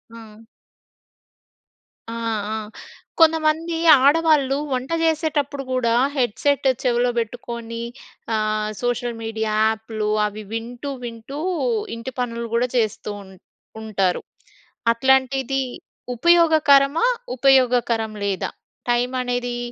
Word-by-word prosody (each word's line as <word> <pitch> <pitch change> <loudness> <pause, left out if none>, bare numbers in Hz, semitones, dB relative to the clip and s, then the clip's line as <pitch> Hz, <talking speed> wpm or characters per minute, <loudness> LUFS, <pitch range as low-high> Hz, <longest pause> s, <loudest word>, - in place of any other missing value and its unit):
ఆ! 225 0 -13 1.7
ఆ! - - -4 0.4
ఆ! - - -2 0.6
కొంతమంది 325 +1 +3 0.3
ఆడవాళ్ళు 290 -2 +4 0.2
వంట 255 +5 -3
చేసేటప్పుడు 295 -3 0
కూడా, 240 -2 +1 0.2
హెడ్ 240 -5 0
సెట్ 285 -2 +2 0.2
చెవిలో 245 0 +2
పెట్టుకోని, 230 0 -5 0.5
ఆహ్, 215 0 0
సోషల్ 245 -1 -2
మీడియా 220 -1 -2
యాప్‍లు 220 -1 -1 0.2
అవి 210 +1 -5
వింటూ 240 +5 -5
వింటూ 235 +5 -7 0.6
ఇంటి 230 +3 -6
పనులు 235 -1 -2
గూడా 240 +2 +2
చేస్తూ 215 -2 -1
ఉం 190 - -15 0.5
ఉంటారు. 195 -4 0 0.7
అట్లాంటిది 265 +1 +2 0.5
ఉపయోగకరమా? 315 - +4 0.3
ఉపయోగకరం 245 -4 +3
లేదా? 195 -2 -2 0.4
టైమనేది 245 0 -1
245 Hz, 90 wpm, -22 LUFS, 225-275 Hz, 1.7 s, ఆడవాళ్ళు